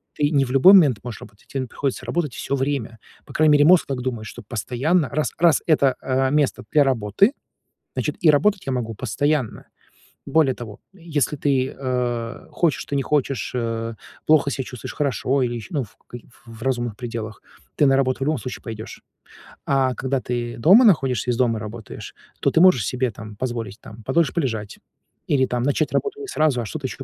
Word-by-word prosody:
ты 145 Hz, -1 st, +1 dB
не 140 Hz, -2 st, +3 dB
в 125 Hz, -, -6 dB
любой 135 Hz, +8 st, +7 dB
момент 145 Hz, -, +6 dB
можешь 120 Hz, -3 st, -7 dB
работать, 105 Hz, -1 st, -15 dB
те 135 Hz, -, -4 dB
н 130 Hz, -, -3 dB
приходится 135 Hz, +2 st, -3 dB
работать 165 Hz, -7 st, -2 dB
всё 140 Hz, -, -3 dB
время. 130 Hz, -5 st, -2 dB, 0.3 s
По -, -, -13 dB
крайней 155 Hz, -1 st, +4 dB
мере 145 Hz, 0 st, +5 dB
мозг 180 Hz, +2 st, +6 dB
так 135 Hz, -2 st, -3 dB
думает, 120 Hz, -3 st, -4 dB
что -, -, -9 dB
постоянно 130 Hz, -, -1 dB
раз, 150 Hz, +1 st, -1 dB
раз 170 Hz, -2 st, +4 dB
это, 140 Hz, -5 st, +3 dB
э, 130 Hz, 0 st, 0 dB
место 150 Hz, -2 st, +1 dB
для 150 Hz, -, +5 dB
работы, 130 Hz, -, +2 dB, 0.6 s
значит -, -, -2 dB
и 165 Hz, -, +4 dB
работать 190 Hz, +7 st, +2 dB
я 135 Hz, -, -1 dB
могу 120 Hz, -3 st, -2 dB
постоянно. 140 Hz, +4 st, -1 dB, 0.6 s
Более 155 Hz, -5 st, +3 dB
того, 110 Hz, -5 st, -9 dB, 0.2 s
если 160 Hz, -6 st, -2 dB
ты, 135 Hz, -2 st, 0 dB
э, 125 Hz, -3 st, -3 dB
хочешь 170 Hz, -4 st, 0 dB
ты -, -, -5 dB
не 140 Hz, -, +1 dB
хочешь, 135 Hz, -6 st, -1 dB
э, 115 Hz, -1 st, -3 dB, 0.3 s
плохо 150 Hz, -2 st, +4 dB
ся 135 Hz, -, -2 dB
чувствуешь, 125 Hz, -2 st, -8 dB
хорошо 140 Hz, -1 st, 0 dB
или 120 Hz, -1 st, -1 dB
ещё, 115 Hz, -3 st, -7 dB
ну, 145 Hz, -, +1 dB
ф 110 Hz, -, -13 dB
каки 120 Hz, -1 st, -10 dB, 0.2 s
в 115 Hz, -1 st, -12 dB
в -, -, -12 dB
разумных 120 Hz, -4 st, -1 dB
пределах, 115 Hz, -3 st, -6 dB, 0.3 s
ты 145 Hz, -, +4 dB
на 135 Hz, 0 st, +4 dB
работу 130 Hz, -1 st, +1 dB
в -, -, -8 dB
любом 155 Hz, 0 st, +1 dB
случае 125 Hz, -, -7 dB
пойдёшь. 110 Hz, -2 st, -8 dB, 0.6 s
А 135 Hz, -2 st, +2 dB
когда 135 Hz, +1 st, -2 dB
ты 120 Hz, -1 st, -4 dB
дома 190 Hz, -, +7 dB
находишься 130 Hz, -, +3 dB
и -, -, +3 dB
из 120 Hz, -, -3 dB
дома 120 Hz, -3 st, +2 dB
работаешь, 110 Hz, 0 st, -8 dB, 0.3 s
то -, -, +2 dB
ты -, -, +2 dB
можешь 180 Hz, -, +6 dB
себе, 125 Hz, -1 st, -1 dB
там, 110 Hz, -2 st, -10 dB
позволить, 115 Hz, -4 st, -4 dB
там, 110 Hz, +1 st, -12 dB
подольше 165 Hz, +3 st, +1 dB
полежать. 115 Hz, -, -3 dB, 0.5 s
Или 130 Hz, -2 st, +3 dB
там, 125 Hz, -1 st, -2 dB
начать 145 Hz, +3 st, 0 dB
работу 425 Hz, 0 st, -1 dB
не 415 Hz, -, -6 dB
сразу, 155 Hz, -, +1 dB
а 115 Hz, -, -4 dB
что-то 140 Hz, +5 st, -4 dB
ещё -, -, -8 dB
130 Hz, 200 wpm, -22 LUFS, 120-145 Hz, 0.6 s, любой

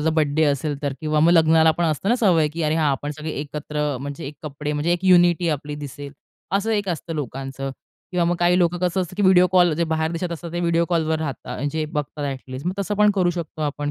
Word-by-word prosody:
जर 160 Hz, +2 st, +1 dB
बर्थडे 155 Hz, 0 st, +2 dB
असेल 145 Hz, 0 st, 0 dB
तर 140 Hz, -2 st, -1 dB
किंवा 155 Hz, -1 st, 0 dB
मग 165 Hz, -, +5 dB
लग्नाला 160 Hz, -1 st, +5 dB
पण 170 Hz, -, +2 dB
असतं 160 Hz, +4 st, -1 dB
ना 240 Hz, -, +4 dB
सवय 175 Hz, -10 st, +3 dB
की 165 Hz, +2 st, -5 dB
अरे, 155 Hz, 0 st, +1 dB
हां, 155 Hz, -3 st, +2 dB
आपण 140 Hz, +2 st, -3 dB
सगळे 155 Hz, 0 st, -5 dB
एकत्र 150 Hz, -1 st, -3 dB
म्हणजे 145 Hz, +2 st, -6 dB
एक 145 Hz, -, -8 dB
कपडे 150 Hz, 0 st, -4 dB
म्हणजे 150 Hz, +4 st, 0 dB
एक 175 Hz, +2 st, -2 dB
युनिटी 175 Hz, -2 st, +5 dB
आपली 150 Hz, -1 st, -3 dB
दिसेल 145 Hz, -1 st, -8 dB, 0.4 s
असं 215 Hz, +3 st, -1 dB
एक 205 Hz, -2 st, -1 dB
असतं 165 Hz, -1 st, -4 dB
लोकांचं 135 Hz, -1 st, -5 dB, 0.4 s
किंवा 175 Hz, -1 st, +2 dB
मग 175 Hz, +1 st, +1 dB
काही 175 Hz, +1 st, +3 dB
लोकं 175 Hz, 0 st, +2 dB
कसं 180 Hz, +1 st, 0 dB
असतं 185 Hz, 0 st, -5 dB
की 205 Hz, -, 0 dB
व्हिडिओ 185 Hz, -2 st, +6 dB
कॉल 175 Hz, -2 st, +5 dB
जे 170 Hz, -, +1 dB
बाहेर 160 Hz, 0 st, -1 dB
देशात 170 Hz, +1 st, -3 dB
असतात, 170 Hz, 0 st, -7 dB
ते 175 Hz, -, -2 dB
व्हिडिओ 170 Hz, -1 st, +2 dB
कॉलवर 160 Hz, -2 st, +1 dB
राहतात, 150 Hz, -4 st, -5 dB
म्हणजे 150 Hz, +3 st, -2 dB
बघतात 150 Hz, 0 st, -3 dB
अ‍ॅटलिस्ट 130 Hz, 0 st, -6 dB
मग 180 Hz, -, 0 dB
तसं 200 Hz, +1 st, -1 dB
पण 210 Hz, 0 st, +4 dB
करू 180 Hz, -3 st, +2 dB
शकतो 165 Hz, -3 st, -5 dB
आपण 145 Hz, 0 st, -2 dB
160 Hz, 235 wpm, -22 LUFS, 145-175 Hz, 0.4 s, व्हिडिओ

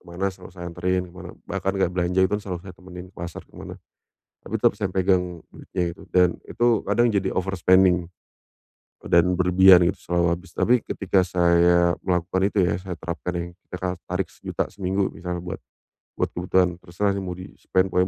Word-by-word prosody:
kemana 90 Hz, +2 st, -3 dB
selalu -, -, -13 dB
saya 85 Hz, -1 st, -7 dB
anterin 90 Hz, +1 st, -1 dB
kemana, 90 Hz, -1 st, -10 dB
bahkan 95 Hz, 0 st, -2 dB
kayak 95 Hz, -2 st, +1 dB
belanja 90 Hz, +1 st, 0 dB
itu 95 Hz, -, 0 dB
kan 105 Hz, -, 0 dB
selalu 90 Hz, -3 st, -5 dB
saya 90 Hz, -, -9 dB
temenin 90 Hz, 0 st, -11 dB
ke -, -, -44 dB
pasar, 85 Hz, 0 st, -7 dB
ke -, -, -30 dB
mana, -, -, -9 dB, 0.7 s
tapi -, -, -3 dB
tetep -, -, +5 dB
saya 100 Hz, -, -1 dB
yang -, -, -25 dB
pegang 95 Hz, -1 st, +3 dB, 0.3 s
duitnya 90 Hz, -2 st, -4 dB
itu -, -, -14 dB
dan 90 Hz, -1 st, +5 dB, 0.2 s
itu 120 Hz, +1 st, 0 dB, 0.2 s
kadang 120 Hz, +4 st, +3 dB
jadi 100 Hz, -3 st, 0 dB
overspending, 95 Hz, -1 st, +3 dB, 1.0 s
eee, -, -, -5 dB
dan 85 Hz, 0 st, +6 dB
berlebihan 90 Hz, -1 st, +6 dB
gitu 95 Hz, -, -3 dB
selalu 85 Hz, 0 st, +2 dB
habis, 90 Hz, 0 st, -13 dB
tapi 125 Hz, -, +2 dB
ketika 95 Hz, -1 st, +1 dB
saya 85 Hz, 0 st, +3 dB
melakukan 90 Hz, 0 st, 0 dB
itu 105 Hz, -, -2 dB
ya, 85 Hz, -, +1 dB
saya 95 Hz, -2 st, -5 dB
terapkan 85 Hz, +1 st, -4 dB
yang 85 Hz, 0 st, -4 dB, 0.2 s
kita 90 Hz, -, -5 dB, 0.2 s
harus 90 Hz, -, -18 dB
tarik 90 Hz, -1 st, -1 dB
Rp1.000.000 -, -, -4 dB
seminggu 95 Hz, 0 st, -1 dB
misal 90 Hz, 0 st, -5 dB
buat 90 Hz, 0 st, -6 dB, 0.6 s
buat -, -, 0 dB
kebutuhan 90 Hz, 0 st, +1 dB
terserah 100 Hz, +4 st, -1 dB
sih -, -, -2 dB
mau 90 Hz, -1 st, -5 dB
di 90 Hz, +1 st, -10 dB
spend 95 Hz, 0 st, 0 dB
pokoknya 90 Hz, +1 st, +2 dB
90 Hz, 195 wpm, -24 LUFS, 90-95 Hz, 1.0 s, dan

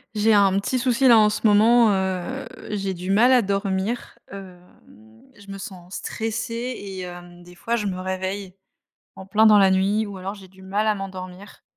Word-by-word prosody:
J'ai 215 Hz, +1 st, +3 dB
un 195 Hz, -1 st, +4 dB
petit 255 Hz, +6 st, -2 dB
souci 255 Hz, +1 st, +2 dB
là 235 Hz, -2 st, +7 dB
en 215 Hz, -1 st, +5 dB
ce 210 Hz, -, -4 dB
moment, 225 Hz, +2 st, +5 dB
heu, 190 Hz, +7 st, -2 dB, 0.2 s
j'ai 195 Hz, -2 st, -3 dB
du 180 Hz, +1 st, -7 dB
mal 230 Hz, +6 st, +4 dB
à 250 Hz, -, +5 dB
dormir. 200 Hz, +2 st, -3 dB
Hem, 185 Hz, -2 st, -11 dB, 0.7 s
je 200 Hz, -1 st, -13 dB
me 195 Hz, -, -7 dB
sens 185 Hz, -2 st, -10 dB
stressée 225 Hz, +1 st, -4 dB, 0.2 s
et 195 Hz, -2 st, -8 dB
hem, 175 Hz, -1 st, -10 dB
des 175 Hz, 0 st, -15 dB
fois 230 Hz, +6 st, -2 dB
je 210 Hz, -3 st, -2 dB
me 185 Hz, -1 st, -4 dB
réveille 190 Hz, +1 st, -4 dB, 0.6 s
en 190 Hz, -, -10 dB
plein 215 Hz, +3 st, +4 dB
dans 210 Hz, -1 st, +7 dB
la 195 Hz, -1 st, +5 dB
nuit, 200 Hz, +3 st, +1 dB
ou 200 Hz, -2 st, -8 dB
alors 190 Hz, +2 st, -6 dB
j'ai 195 Hz, -2 st, -14 dB
du 190 Hz, +1 st, -19 dB
mal 200 Hz, +3 st, -2 dB
à 215 Hz, -, +2 dB
m'endormir. 190 Hz, 0 st, -9 dB
195 Hz, 195 wpm, -23 LUFS, 190-215 Hz, 0.7 s, là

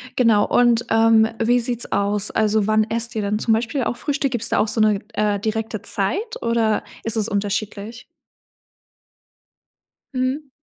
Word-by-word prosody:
genau, 225 Hz, -4 st, +3 dB
und, 240 Hz, -1 st, +2 dB
ähm, 225 Hz, 0 st, +4 dB, 0.2 s
wie 245 Hz, +2 st, +3 dB
sieht's 240 Hz, 0 st, -2 dB
aus? 200 Hz, +1 st, +1 dB
Also, 215 Hz, -1 st, +1 dB
wann 215 Hz, 0 st, +2 dB
esst 230 Hz, +1 st, -1 dB
ihr 220 Hz, -, -1 dB
dann 205 Hz, +1 st, -1 dB
zum 225 Hz, -, +1 dB
Beispiel 245 Hz, +4 st, -1 dB
auch 235 Hz, -, -3 dB
Frühstück? 275 Hz, -2 st, -2 dB
Gibt's 235 Hz, -2 st, -1 dB
da -, -, +1 dB
auch 215 Hz, -, +2 dB
so 220 Hz, -, -2 dB
'ne, 210 Hz, -2 st, +3 dB
äh, 210 Hz, -1 st, 0 dB
direkte 220 Hz, 0 st, -3 dB
Zeit, 390 Hz, -, -1 dB
oder 230 Hz, -2 st, 0 dB, 0.2 s
ist 225 Hz, 0 st, -2 dB
es 215 Hz, -1 st, +1 dB
unterschiedlich? 205 Hz, +2 st, -4 dB, 2.1 s
Mhm. 260 Hz, +3 st, -2 dB
225 Hz, 160 wpm, -21 LUFS, 210-240 Hz, 2.1 s, ähm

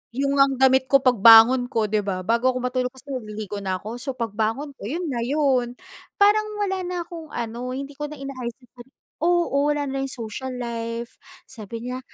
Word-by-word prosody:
yung 275 Hz, +1 st, 0 dB
ngang 275 Hz, 0 st, +5 dB
damit 265 Hz, 0 st, +4 dB
ko 275 Hz, -, +7 dB
pagbangon 240 Hz, +1 st, +7 dB
ko 225 Hz, -3 st, 0 dB
'di 215 Hz, 0 st, 0 dB
ba, 190 Hz, -2 st, -3 dB
bago 235 Hz, +5 st, +2 dB
ako 255 Hz, -, -1 dB
matulog 250 Hz, 0 st, -1 dB
kasi 260 Hz, -, -16 dB
naliligo 215 Hz, -4 st, -5 dB
na 190 Hz, -1 st, -2 dB
ako. 220 Hz, +6 st, -7 dB
So, 270 Hz, -1 st, -4 dB
pagbangon 225 Hz, +5 st, -2 dB
ko -, -, -25 dB
'yon 335 Hz, +9 st, -3 dB
na 240 Hz, -, -2 dB
'yon. 255 Hz, -2 st, +1 dB, 0.4 s
Parang 425 Hz, +1 st, +4 dB
wala 385 Hz, -2 st, -1 dB
na 355 Hz, -1 st, -3 dB
akong 330 Hz, -2 st, -9 dB
ano 235 Hz, +2 st, -4 dB
hindi 275 Hz, +2 st, -6 dB
ko 295 Hz, -, -2 dB
na 300 Hz, -, -8 dB
inaayos 260 Hz, -4 st, -6 dB
yung 245 Hz, -, -23 dB
sarili 250 Hz, +2 st, -15 dB
ko -, -, -72 dB, 0.2 s
oo 335 Hz, -4 st, +2 dB
wala 295 Hz, -1 st, 0 dB
na 270 Hz, -1 st, -3 dB
'yong 270 Hz, -, -3 dB
social 255 Hz, +4 st, -6 dB
life. 235 Hz, -1 st, -5 dB, 0.2 s
Sabi 230 Hz, -1 st, -9 dB
niya, 250 Hz, +1 st, -4 dB
255 Hz, 205 wpm, -23 LUFS, 230-280 Hz, 0.4 s, ko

